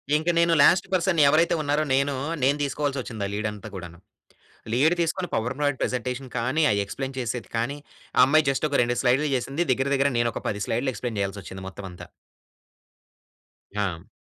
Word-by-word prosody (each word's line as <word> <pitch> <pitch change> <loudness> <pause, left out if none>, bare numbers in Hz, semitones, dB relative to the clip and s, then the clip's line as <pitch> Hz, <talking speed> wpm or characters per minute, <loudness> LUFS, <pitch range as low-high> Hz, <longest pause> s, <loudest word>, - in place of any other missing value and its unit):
ఇంక 160 +3 0
నేను 170 0 +4
last 180 +5 +5
person 185 -1 +1
ఎవరైతే 165 +4 +4
ఉన్నారో 145 +1 +1
నేను, 140 +1 +1 0.3
నేను 140 +2 +3
తీసుకోవాల్సి 140 0 -1
వచ్చింది 110 -5 -4
ఆ - - -6
లీడ్ 105 +1 -1
అంతా 105 +1 -9
కూడాను. 85 -2 -8 0.8
లీడ్ 150 +7 +4
తీసుకొని 170 +2 -1
పవర్ 120 +3 -1
పాయింట్ 145 -2 0
ప్రెజెంటేషన్ 125 +1 -3
కానీ, 130 +7 +1
అది 100 - +1
ఎక్స్‌ప్లేన్ 135 +5 -5
చేసేది 120 -1 -4
కానీ, 125 +5 -1 0.4
ఆ - - +5
అమ్మాయి 150 +2 +3
జస్ట్ 135 +3 0
ఒక 140 - +1
2 120 0 -1
స్లైడ్‌లు 135 +4 +2
చేసింది. 135 +6 -1
దగ్గర 135 +2 -1
దగ్గర 140 0 +2
నేను 120 0 +2
ఒక - - -5
10 105 -1 -4
స్లైడ్‌లు 125 +4 0
ఎక్స్‌ప్లేన్ 120 -4 -4
చేయాల్సి 100 +1 -3
వచ్చింది 95 0 -9
మొత్తం 95 +1 -9
అంతా. 90 - -11 1.7
ఆ! 95 -5 -2
130 Hz, 180 wpm, -25 LUFS, 115-145 Hz, 1.7 s, last